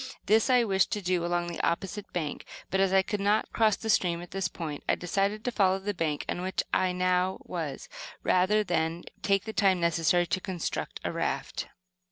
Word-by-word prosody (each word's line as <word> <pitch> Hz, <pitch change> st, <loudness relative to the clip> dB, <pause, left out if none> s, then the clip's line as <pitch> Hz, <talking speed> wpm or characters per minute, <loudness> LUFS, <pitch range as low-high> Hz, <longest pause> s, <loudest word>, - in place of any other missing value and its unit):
This 220 Hz, +4 st, +4 dB
I 250 Hz, -2 st, +5 dB
wished 195 Hz, -3 st, +2 dB
to 210 Hz, -, -2 dB
do 180 Hz, -1 st, +1 dB
along 175 Hz, 0 st, 0 dB
the 170 Hz, -1 st, -4 dB
opposite 195 Hz, +4 st, -2 dB
bank, 155 Hz, -5 st, -3 dB, 0.3 s
but, 190 Hz, -, +1 dB
as 195 Hz, -1 st, +3 dB
I 190 Hz, 0 st, +5 dB
could 210 Hz, +1 st, -3 dB
not 205 Hz, +2 st, +1 dB
cross 220 Hz, -3 st, +4 dB
the 225 Hz, -, -7 dB
stream 175 Hz, -5 st, +2 dB
at 175 Hz, -, -12 dB
this 195 Hz, 0 st, -1 dB
point, 155 Hz, -5 st, -6 dB
I -, -, +4 dB
decided 200 Hz, +4 st, -1 dB
to 245 Hz, -, 0 dB
follow 190 Hz, -4 st, +3 dB
the 200 Hz, +2 st, -3 dB
bank 155 Hz, -5 st, -2 dB
on 175 Hz, -, -2 dB
which 190 Hz, +1 st, -1 dB
I 185 Hz, -1 st, +3 dB
now 180 Hz, +1 st, +1 dB
was, -, -, -5 dB, 0.4 s
rather 195 Hz, +4 st, +3 dB
than 170 Hz, -2 st, -1 dB, 0.2 s
take 195 Hz, -1 st, +2 dB
the 220 Hz, -, -6 dB
time 195 Hz, -4 st, +3 dB
necessary 170 Hz, +1 st, +2 dB
to 175 Hz, +2 st, -1 dB
construct 180 Hz, -4 st, -4 dB
a -, -, -1 dB
raft. -, -, -2 dB
185 Hz, 205 wpm, -28 LUFS, 175-205 Hz, 0.4 s, I